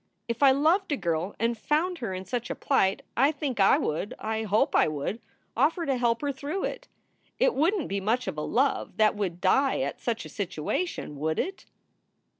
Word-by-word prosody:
If 235 +1 -3
I 280 - +8
loved 315 +8 +3
a 290 - +1
girl 170 0 -2
and 230 +2 +1
found 315 +9 0
her 230 -5 -3
in 185 0 -5
such 235 +4 -3
a - - -2
plight, 195 -8 +1
I 275 +5 +4
think 280 -6 -4
I 195 - +6
would 160 +7 -2
I 220 0 -2
hope 215 0 +1
I - - +5
would 155 +9 -3 0.3
offer 320 +7 +2
to 275 - +1
help 235 -2 +1
her 285 - +1
through 285 +8 -4
it. - - -4 0.5
It - - +3
wouldn 350 +7 +2
t - - -4
be 200 0 -2
much 230 +6 0
of - - -3
a 150 - -3
love 265 - 0
that 215 -1 +4
would 185 -4 -3
die 265 +9 +2
at - - -3
such 230 -2 -2
a - - -8
situation, 170 - -3
would 160 +1 -1
it?" 385 +1 -3
235 Hz, 210 wpm, -27 LUFS, 195-285 Hz, 0.5 s, I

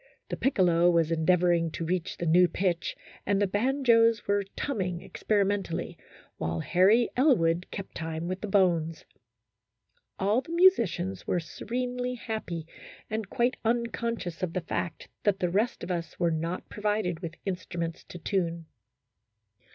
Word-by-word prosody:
The - - -2
piccolo 175 -9 +3
was 170 -2 +2
endeav 165 +2 +3
oring 170 -2 +2
to 165 - -3
reach 175 0 -2
the 175 - -3
new 175 +2 +6
pitch, 175 -2 -1 0.3
and 200 0 +1
the 205 - +3
banjos 230 +1 +3
were 200 0 +1
tumming 185 -11 -2
experimentally, 200 -4 -1 0.4
while 80 +1 -2
Harry 205 +7 +4
Elwood 180 - +3
kept 195 - -7
time 160 0 -4
with 185 +1 -3
the 215 - -3
bones. 170 -5 +2 1.1
All 205 +6 +2
the 325 +5 -8
musicians 210 - +3
were 180 - +1
se 165 -2 -9
renely 250 +1 -2
happy 200 -9 -4 0.5
and 220 -3 -3
quite 245 0 +1
unconscious 230 -5 -1
of 180 -3 -2
the 185 - -1
fact 170 0 -4
that 205 -2 +2
the 180 -2 0
rest 215 +6 0
of - - -4
us 170 -1 -4
were 170 -2 +2
not 165 +3 -3
provided 210 -5 -1
with 170 -2 -6
instruments 175 -3 -4
to - - -9
tune. 170 -2 -1
185 Hz, 150 wpm, -28 LUFS, 170-220 Hz, 1.1 s, new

